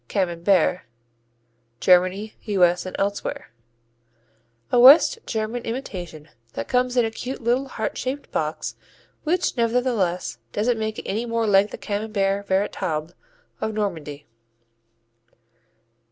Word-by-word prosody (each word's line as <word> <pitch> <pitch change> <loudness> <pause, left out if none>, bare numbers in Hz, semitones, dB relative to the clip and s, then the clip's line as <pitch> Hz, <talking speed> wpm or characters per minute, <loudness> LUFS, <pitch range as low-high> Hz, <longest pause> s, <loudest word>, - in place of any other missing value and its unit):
"Camembert" 180 0 +1 1.0
Germany, 185 +4 +3
U.S. 180 -4 +2
& - - -5
elsewhere 200 +1 -3 1.2
A - - +4
West 280 - +8
German 220 +2 -2
imitation 180 - -6 0.2
that 115 - -5
comes 250 0 +1
in 240 - +4
a 225 - -2
cute 255 +4 -6
little 250 +3 0
heart 220 -4 -4
shaped 270 +3 -4
box - - -3 0.5
which 355 +3 +1
nevertheless 230 - 0
doesn't 225 +2 0
make 220 0 -3
it - - -7
any 225 +4 -2
more 230 0 0
like 205 0 +4
the - - -7
Camembert 200 -1 -2
véritable 185 -5 -1 0.5
of 220 -1 -2
Normandy. 160 -9 -4
210 Hz, 115 wpm, -23 LUFS, 185-240 Hz, 1.2 s, West